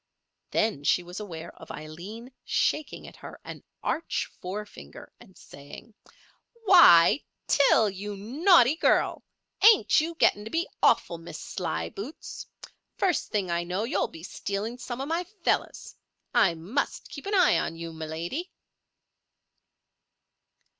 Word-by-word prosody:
Then 215 Hz, -10 st, 0 dB
she 180 Hz, -, +2 dB
was 175 Hz, +3 st, -8 dB
aware 170 Hz, -5 st, -8 dB
of -, -, -12 dB
Aileen 185 Hz, -, -9 dB
shaking 305 Hz, -2 st, -1 dB
at -, -, -13 dB
her -, -, -11 dB
an -, -, -9 dB, 0.2 s
arch 330 Hz, -, -2 dB
forefinger, 205 Hz, +3 st, -8 dB
and 200 Hz, -6 st, -18 dB
saying: 140 Hz, +10 st, -13 dB, 0.7 s
"Why, 295 Hz, -, +7 dB, 0.2 s
Til, 250 Hz, -6 st, +4 dB
you 200 Hz, +1 st, -6 dB
naughty 275 Hz, -, +4 dB
girl! -, -, +1 dB, 0.4 s
Ain't 430 Hz, -6 st, +6 dB
you 330 Hz, +2 st, -4 dB
getting 205 Hz, -9 st, +2 dB
to 220 Hz, -, -7 dB
be 330 Hz, +6 st, -1 dB
awful, 170 Hz, -, +2 dB
Miss 165 Hz, -, -9 dB
Slyboots! 85 Hz, -, -6 dB, 0.5 s
First 370 Hz, -4 st, 0 dB
thing 195 Hz, -4 st, -1 dB
I 170 Hz, 0 st, 0 dB
know 180 Hz, +4 st, -2 dB
you'll 230 Hz, -, 0 dB
be 160 Hz, -, -13 dB
stealing 205 Hz, +5 st, -4 dB
some 240 Hz, 0 st, -6 dB
of 275 Hz, -, -4 dB
my 335 Hz, +3 st, -1 dB, 0.2 s
fellows. -, -, -1 dB, 0.4 s
I 190 Hz, -7 st, +4 dB
must 190 Hz, -, -3 dB
keep 280 Hz, -, -9 dB
an 405 Hz, -, 0 dB
eye 360 Hz, -, +5 dB
on 165 Hz, -, -3 dB
you, 165 Hz, 0 st, -7 dB
my 160 Hz, 0 st, -6 dB
lady." 170 Hz, -, -4 dB
210 Hz, 135 wpm, -27 LUFS, 170-285 Hz, 0.7 s, Why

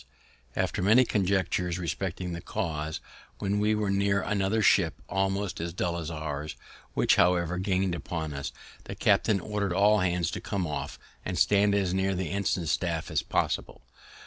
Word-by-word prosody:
After -, -, -1 dB
many 110 Hz, +7 st, +5 dB
conjectures 95 Hz, -4 st, 0 dB
respecting 90 Hz, +1 st, -3 dB
the 85 Hz, -, -5 dB
cause, 80 Hz, -6 st, -3 dB, 0.4 s
when 100 Hz, 0 st, -1 dB
we 105 Hz, +1 st, +2 dB
were 105 Hz, -2 st, 0 dB
near 100 Hz, 0 st, +2 dB
another 105 Hz, +2 st, +1 dB
ship 85 Hz, -6 st, +4 dB
almost 95 Hz, +1 st, -1 dB
as 85 Hz, 0 st, -4 dB
dull 85 Hz, -1 st, -1 dB
as 85 Hz, -2 st, -4 dB
ours, 75 Hz, -2 st, -4 dB, 0.4 s
which, -, -, +3 dB
however, 90 Hz, 0 st, +3 dB
gain'd 95 Hz, -1 st, 0 dB
upon 80 Hz, -3 st, -4 dB
us, 70 Hz, 0 st, -4 dB, 0.3 s
the -, -, -6 dB
captain 105 Hz, -3 st, +3 dB
ordered 100 Hz, -1 st, -2 dB
all 105 Hz, +3 st, +4 dB
hands 90 Hz, -3 st, 0 dB
to -, -, -5 dB
come 95 Hz, -3 st, -2 dB
aft, 75 Hz, -2 st, -4 dB, 0.2 s
and 90 Hz, -1 st, -3 dB
stand 100 Hz, +3 st, +4 dB
as 95 Hz, -3 st, +1 dB
near 95 Hz, 0 st, +1 dB
the 90 Hz, -3 st, -3 dB
ensign 95 Hz, -3 st, 0 dB
staff 80 Hz, +1 st, -1 dB
as -, -, +1 dB
possible. -, -, -2 dB
95 Hz, 165 wpm, -28 LUFS, 85-100 Hz, 0.4 s, many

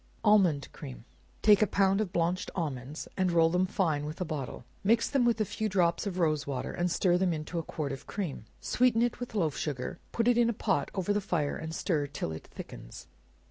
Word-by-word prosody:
Almond 190 Hz, -10 st, +4 dB
Cream. -, -, -9 dB, 0.4 s
Take 210 Hz, -1 st, +7 dB
a 215 Hz, -, +5 dB
pound 195 Hz, +2 st, +3 dB
of 200 Hz, -5 st, -2 dB
blanched 175 Hz, 0 st, 0 dB
almonds, 145 Hz, -4 st, -4 dB
and 185 Hz, -2 st, +1 dB
roll 165 Hz, -1 st, +4 dB
them 180 Hz, +2 st, +2 dB
fine 165 Hz, -7 st, 0 dB
with 150 Hz, +2 st, -6 dB
a 180 Hz, -, -1 dB
bottle; 145 Hz, -6 st, -5 dB, 0.2 s
mix 230 Hz, +3 st, +3 dB
them 270 Hz, -4 st, +2 dB
with 235 Hz, -2 st, +2 dB
a 215 Hz, -, +2 dB
few 215 Hz, +2 st, -2 dB
drops 180 Hz, 0 st, +2 dB
of 185 Hz, -2 st, -3 dB
rose 155 Hz, -5 st, +1 dB
water, 135 Hz, -3 st, -3 dB
and 175 Hz, +1 st, 0 dB
stir 175 Hz, +1 st, +2 dB
them 185 Hz, -2 st, +2 dB
into 160 Hz, +2 st, -3 dB
a -, -, -3 dB
quart 150 Hz, -3 st, -4 dB
of 135 Hz, -, -7 dB
cream; 175 Hz, -, -4 dB
sweeten 245 Hz, -2 st, +3 dB
it 240 Hz, -, -1 dB
with 245 Hz, -2 st, -6 dB
loaf 165 Hz, -8 st, +1 dB
sugar, 150 Hz, +4 st, -3 dB
put 230 Hz, 0 st, 0 dB
it 245 Hz, -1 st, +4 dB
in 235 Hz, -1 st, +4 dB
a -, -, +1 dB
pot 205 Hz, -2 st, 0 dB
over 190 Hz, +1 st, +1 dB
the 205 Hz, -, +1 dB
fire, 160 Hz, -6 st, -1 dB
and 160 Hz, 0 st, -5 dB
stir 155 Hz, -6 st, 0 dB
it 140 Hz, +1 st, -13 dB
till -, -, -2 dB
it 80 Hz, -, -8 dB
thickens. -, -, -10 dB
175 Hz, 225 wpm, -30 LUFS, 155-205 Hz, 0.4 s, Take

